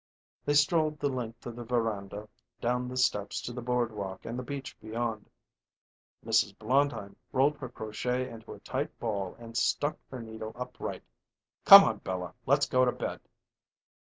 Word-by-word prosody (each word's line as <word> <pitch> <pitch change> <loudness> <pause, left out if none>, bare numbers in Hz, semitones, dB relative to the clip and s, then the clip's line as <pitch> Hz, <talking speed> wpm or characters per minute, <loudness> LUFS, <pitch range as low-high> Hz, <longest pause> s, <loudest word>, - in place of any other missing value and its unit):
They 145 - +2
strolled 155 +1 +3
the 145 - +1
length 120 -3 -5
of 120 - -6
the 120 - -6
veranda, 110 -3 -2 0.3
down 125 +1 0
the 130 +1 -5
steps 105 -5 +1
to 120 - -5
the 125 - -5
boardwalk 115 -6 -2
and 120 +2 -4
the - - -2
beach 135 +1 -6
beyond. 110 0 -4 1.0
Mrs. 100 - +2
Blondheim 125 -4 0 0.2
rolled 140 +3 +3
her 130 - -6
crochet 125 +3 -2
into 115 -1 -10
a - - -12
tight - - -3
ball 100 -5 -2
and 115 -1 -11
stuck 145 +4 +1
her 130 - -7
needle 110 -1 -7
upright. 125 +1 -6 0.6
"Come - - +13
on, - - 0
Bella; 90 -1 -4
let's 140 +2 +4
go 130 0 +3
to 125 - +3
bed." - - -4
120 Hz, 160 wpm, -30 LUFS, 110-130 Hz, 1.0 s, Come